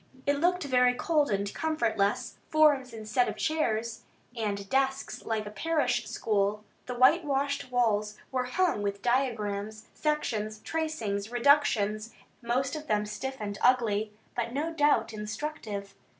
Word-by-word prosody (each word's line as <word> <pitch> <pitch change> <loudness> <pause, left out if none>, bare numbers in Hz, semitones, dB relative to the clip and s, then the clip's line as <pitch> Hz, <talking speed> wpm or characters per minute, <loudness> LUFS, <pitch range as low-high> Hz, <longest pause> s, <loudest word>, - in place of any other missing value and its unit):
It 285 0 +2
looked 360 +2 +2
very 250 -3 +3
cold 300 +2 +1
and 200 0 -1
comfortless; 250 -7 0
forms 295 -5 +4
instead 225 +3 0
of - - -6
chairs, 235 -8 -1 0.3
and 200 -3 -2
desks 270 +3 0
like 220 -1 -1
a 210 - -7
parish 250 -5 0
school. 210 -2 0 0.2
The 250 - -4
whitewashed 280 0 +2
walls 215 -4 +1
were 255 -1 0
hung 335 - +1
with 200 -1 -3
diagrams, 215 -4 -1
sections, 220 -9 -1
tracings, 230 -11 -2
reductions, 235 -5 +2 0.3
most 255 +4 0
of 310 0 -7
them 210 -2 +1
stiff 265 +5 -5
and 205 -1 -4
ugly, 220 -4 +3 0.2
but 235 -1 -2
no 310 +4 -2
doubt 290 -8 +2
instructive. 210 -2 -5
245 Hz, 135 wpm, -29 LUFS, 210-285 Hz, 0.3 s, forms